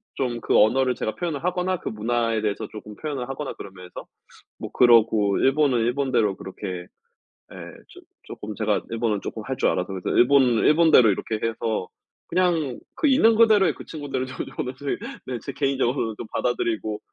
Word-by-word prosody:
좀 120 -3 -2
그 - - +2
언어를 125 +4 +3
제가 110 - -3
표현을 165 -4 -4
하거나 180 +1 0
그 - - -9
문화에 115 0 -1
대해서 105 -2 -2
쪼끔 105 -1 -10
표현을 135 -4 -5
하거나 135 +1 -5
그러면서 90 -2 -10 0.5
뭐 - - -7
그러고 110 -4 +4
일본은 135 -2 +3
일본대로 120 -5 +1
그렇게 90 -2 -7 0.7
예 - - -11 0.3
쪼 - - -15 0.2
쪼끔 105 0 -8
제가 110 -2 0
일본어 115 -2 -1
쪼끔 110 - -6
할 130 0 -4
줄 - - +2
알아서 90 - -1
그래서 95 - -4
일본은 125 -2 +4
일본대로 155 -7 +6
이렇게 105 +2 -2
해서 110 -3 -2 0.4
그냥 165 -8 0 0.2
그 310 - +1
있는 230 -4 +5
그대로의 215 -4 +5
그 - - -11
친구들도 135 -4 -5 0.2
저는 130 +1 -3
제 140 -1 -2 0.3
네 125 -2 -4
제 - - -7
개인적으로는 130 -4 -1
좀 115 - -7
받아들이고 110 -3 -1
120 Hz, 380 characters per minute, -24 LUFS, 110-140 Hz, 0.7 s, 일본대로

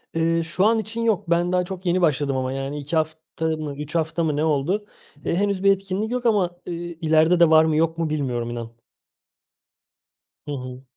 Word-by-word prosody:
Eee, 165 0 +2
şu 170 +4 0
an 225 +1 +4
için 220 +1 -4
yok. 210 -5 0
Ben 175 +1 +2
daha 180 0 +2
çok 190 0 -7
yeni 180 +1 +2
başladım 145 -4 +1
ama, 130 0 -1
yani, 135 +2 -4
2 145 +3 -4
hafta 160 0 -2
mı, 155 -3 -3
3 150 +2 -6
hafta 165 +1 0
mı 150 -2 0
ne 150 - 0
oldu. 160 +7 0 0.4
Eee, - - 0
henüz 200 0 0
bir 195 - +6
etkinlik 195 +3 -2
yok 250 0 -2
ama, 190 -6 +2
eee, 175 - -4
ileride 165 0 +2
de 170 -2 +6
var 160 0 +6
mı, 160 -1 +1
yok 165 +1 +1
mu 165 -2 -1
bilmiyorum, 125 -6 -2
inan. 115 -1 -6 1.8
Hı - - -4
hı. 130 -2 -6
165 Hz, 200 wpm, -23 LUFS, 150-185 Hz, 1.8 s, bir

